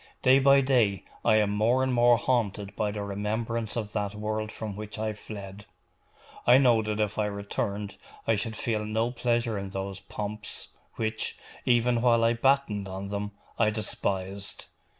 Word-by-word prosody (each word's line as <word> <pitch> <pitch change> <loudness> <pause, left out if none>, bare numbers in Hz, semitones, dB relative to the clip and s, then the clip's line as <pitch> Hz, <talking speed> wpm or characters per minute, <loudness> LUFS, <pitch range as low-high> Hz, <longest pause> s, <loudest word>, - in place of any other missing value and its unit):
Day 130 +1 +7
by 140 0 +6
day 120 -8 +2 0.2
I 110 - +5
am 105 -2 +3
more 115 +5 +2
and 130 -1 +1
more 120 0 +5
haunted 105 -5 -1
by 105 - 0
the 105 0 -4
remembrance 110 +3 -2
of 105 -3 -3
that 105 -1 -2
world 110 +1 -3
from 105 -3 -5
which 105 +1 -7
I 110 0 -1
fled. 100 -1 -9 0.8
I 125 +1 +8
know 120 -4 +5
that 105 0 -2
if 105 0 0
I 105 - +2
returned 100 0 -3 0.3
I 115 - +3
should 110 +1 -2
feel 110 -1 -1
no 110 +3 0
pleasure 120 -3 0
in 100 0 -5
those 95 0 -4
pomps, 105 +1 -5 0.3
which, 110 -1 -2 0.3
even 120 -1 +3
while 115 -2 +4
I 115 +1 +4
battened 120 -5 +1
on 95 +1 -5
them, 100 0 -3 0.3
I 110 -2 +5
despised. 100 -2 -2
110 Hz, 170 wpm, -28 LUFS, 100-115 Hz, 0.8 s, I